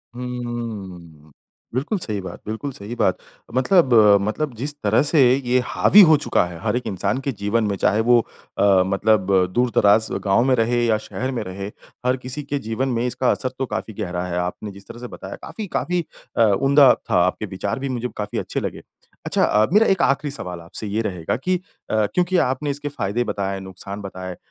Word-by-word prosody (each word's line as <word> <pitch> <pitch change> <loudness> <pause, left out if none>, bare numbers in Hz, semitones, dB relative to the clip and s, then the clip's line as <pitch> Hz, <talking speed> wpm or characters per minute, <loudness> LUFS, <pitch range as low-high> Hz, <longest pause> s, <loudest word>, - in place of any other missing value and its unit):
हुँ, 110 -11 -6 0.4
बिल्कुल 145 - -1
सही 105 -9 -3
बात, 90 -2 -8
बिल्कुल 110 +6 -4
सही 110 0 -8
बात। 95 -5 +1 0.4
मतलब 135 -1 +3 0.3
मतलब 120 +7 -2
जिस 140 +6 -3
तरह 105 +2 +3
से 150 +1 +3 0.2
ये 130 -2 +1
हावी 210 - +6
हो 155 - +7
चुका 145 - +1
है 85 -2 -8
हर - - 0
एक 125 - -5
इंसान 100 +5 -1
के 140 - -2
जीवन 105 +3 +1
में, 100 -2 0
चाहे 105 +4 +2
वो 120 +1 +5 0.4
अ, 95 -2 +4
मतलब 100 0 +1 0.2
दूर-दराज 110 -3 +3 0.2
गाँव 100 +4 +3
में 130 - +3
रहे 120 +1 +1
या 110 -2 +3
शहर 130 +2 -3
में 125 - -3
रहे, 95 +2 -6 0.4
हर 130 +1 +2
किसी 130 +4 -5
के 140 0 -3
जीवन 130 +4 -1
में 120 0 0
इसका 125 +1 +1
असर 130 - -1
तो 135 - 0
काफ़ी 110 - -5
गहरा 90 -2 -3
है, 90 -1 -3
आपने 90 +4 -3
जिस 100 0 -14
तरह 120 - -10
से 125 - -7
बताया, - - -8
काफ़ी 215 -3 -8
काफ़ी 180 0 -1 0.3
अ, 115 - +5 0.2
उम्दा 135 -1 +6
था, 90 - +1
आपके 95 +3 -2
विचार 100 +5 -4
भी 135 0 -3
मुझे 125 -1 -2
काफ़ी 105 0 -3
अच्छे - - -3
लगे। - - -5 0.4
अच्छा - - +1
अ, 105 +1 +4
मेरा 220 +2 +5
1 190 -2 +2
आखिरी 140 +1 +1
सवाल 90 -10 -6
आपसे 95 +5 -6
ये 105 +3 -1
रहेगा 90 -7 -2
कि 185 +7 0 0.3
अ, 110 -1 +2
क्योंकि 180 0 +2
आपने 140 +3 -2
इसके 145 +1 -5
फ़ायदे 115 -2 -2
बताए, 100 -3 -3
नुकसान 95 +2 -8
बताए, 95 -2 -7
अ, - - -16
115 Hz, 200 wpm, -22 LUFS, 100-130 Hz, 0.4 s, हो